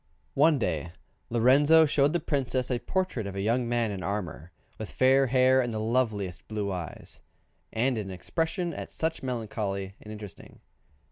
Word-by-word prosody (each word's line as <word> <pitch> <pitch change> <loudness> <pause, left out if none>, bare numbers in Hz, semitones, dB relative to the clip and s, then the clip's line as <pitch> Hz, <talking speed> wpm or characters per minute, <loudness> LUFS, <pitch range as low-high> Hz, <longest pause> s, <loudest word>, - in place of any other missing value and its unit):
One 150 +2 +4
day 85 - -2 0.4
Lorenzo 140 +7 +5
showed 145 -1 +3
the 175 - +1
Princess 130 -4 -1
a 120 - 0
portrait 180 - -2
of 100 - -6
a 100 - -2
young 115 +3 +1
man 120 -2 +1
in 95 -2 -5
armour, 90 -5 -4 0.3
with 110 - -5
fair 135 +1 +4
hair 130 +1 +4
and 120 -2 -2
the 110 - -3
loveliest 110 -6 -1
blue 105 -2 -2
eyes, 90 -4 -6 0.5
and 120 +1 +1
an 100 -2 -5
expression 165 - -2
at - - -7
once 160 0 -1
melancholy 105 -6 -3
and 105 - -10
interesting. 105 -2 -10
120 Hz, 160 wpm, -28 LUFS, 100-135 Hz, 0.5 s, Lorenzo